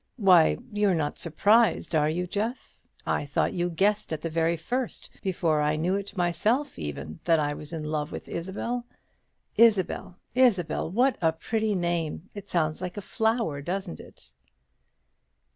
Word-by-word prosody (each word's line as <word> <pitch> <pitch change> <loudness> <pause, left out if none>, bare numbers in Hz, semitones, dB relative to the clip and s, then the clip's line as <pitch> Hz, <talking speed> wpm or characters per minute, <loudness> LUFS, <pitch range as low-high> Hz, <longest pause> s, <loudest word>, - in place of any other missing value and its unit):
Why, 185 -7 +5 0.2
you're 205 -3 +2
not 150 -2 -2
surprised, 205 +5 +3
are 150 -1 +3
you, 175 +3 -1
Jeff? 215 +7 -3 0.3
I - - 0
thought 145 0 0
you 175 0 0
guessed 200 +5 +1
at 160 - -3
the 165 - -3
very 165 +1 +1
first 245 +9 -4
before 170 -5 +1
I 150 +1 +2
knew 170 +4 0
it 200 0 -4
myself 215 +11 0
even 75 +1 -6
that 165 -2 +4
I 145 -1 0
was 150 +1 -9
in 160 -2 -4
love 150 0 -2
with - - -7
Isabel. 230 +8 -4 0.7
Isabel! 205 -5 +3 0.2
Isabel! 220 -11 +2
what 250 +8 +2
a 165 -1 +4
pretty 215 +6 -1
name! 170 0 -2
It 205 -1 -9
sounds 155 -1 0
like 180 +1 -5
a - - -3
flower, 220 - 0
doesn't 185 +4 -4
it?" - - -14
175 Hz, 160 wpm, -27 LUFS, 160-210 Hz, 0.7 s, Why